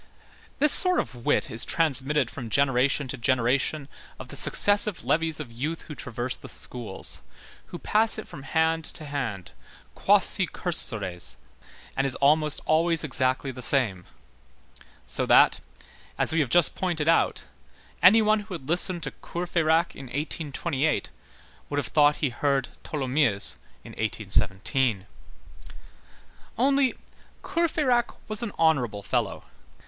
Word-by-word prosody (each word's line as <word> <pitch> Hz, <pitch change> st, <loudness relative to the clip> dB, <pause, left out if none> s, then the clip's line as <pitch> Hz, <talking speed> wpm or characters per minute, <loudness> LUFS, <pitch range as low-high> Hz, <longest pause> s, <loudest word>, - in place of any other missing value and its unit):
This 300 Hz, 0 st, +5 dB
sort 365 Hz, -1 st, +9 dB
of 120 Hz, -2 st, -6 dB
wit -, -, +1 dB
is 110 Hz, -, +2 dB
transmitted 150 Hz, -2 st, +1 dB
from 120 Hz, -4 st, -8 dB
generation 135 Hz, +1 st, +1 dB
to 135 Hz, -, -5 dB
generation 130 Hz, +4 st, 0 dB, 0.3 s
of -, -, -11 dB
the -, -, -8 dB
successive 205 Hz, -1 st, +3 dB
levies 160 Hz, -1 st, -1 dB
of 140 Hz, -6 st, -8 dB
youth 145 Hz, +8 st, -5 dB
who 150 Hz, -, -10 dB
traverse 125 Hz, -2 st, -4 dB
the -, -, -11 dB
schools, 115 Hz, -6 st, -6 dB, 0.5 s
who 175 Hz, -, -8 dB
pass 220 Hz, +5 st, +1 dB
it 215 Hz, -, -8 dB
from 140 Hz, -, -11 dB
hand 160 Hz, +3 st, 0 dB
to 155 Hz, -, -10 dB
hand, 125 Hz, -10 st, -5 dB, 0.4 s
quasi -, -, +2 dB
cursores, 95 Hz, -4 st, 0 dB, 0.6 s
and 135 Hz, 0 st, 0 dB
is 130 Hz, -, -3 dB
almost 150 Hz, +1 st, +2 dB
always 165 Hz, +1 st, +2 dB
exactly 130 Hz, -2 st, 0 dB
the 125 Hz, 0 st, -10 dB
same; 110 Hz, -11 st, +3 dB, 1.0 s
so -, -, -3 dB
that, -, -, +5 dB, 0.6 s
as -, -, -1 dB
we 165 Hz, -, +1 dB
have 140 Hz, -5 st, 0 dB
just 175 Hz, +2 st, +5 dB
pointed 170 Hz, -5 st, -3 dB
out, 165 Hz, -, +1 dB, 0.6 s
any 210 Hz, +6 st, +6 dB
one 215 Hz, 0 st, +2 dB
who 205 Hz, -2 st, -8 dB
had 135 Hz, -5 st, -10 dB
listened 175 Hz, +1 st, +1 dB
to 135 Hz, -, -4 dB
Courfeyrac 170 Hz, -1 st, -1 dB
in 135 Hz, -, -10 dB
1828 150 Hz, +2 st, -3 dB, 0.6 s
would 145 Hz, -, -4 dB
have 145 Hz, -, -1 dB
thought 150 Hz, -1 st, +3 dB
he 145 Hz, -, -2 dB
heard 135 Hz, +1 st, -1 dB
Tholomyès 135 Hz, -7 st, 0 dB, 0.3 s
in -, -, -12 dB
1817. 105 Hz, +1 st, -1 dB, 1.5 s
Only, 275 Hz, +2 st, +1 dB, 0.5 s
Courfeyrac 300 Hz, -8 st, 0 dB
was 215 Hz, +1 st, -2 dB
an 235 Hz, -3 st, -4 dB
honorable 125 Hz, -11 st, 0 dB
fellow. -, -, -3 dB
145 Hz, 135 wpm, -25 LUFS, 125-170 Hz, 1.5 s, sort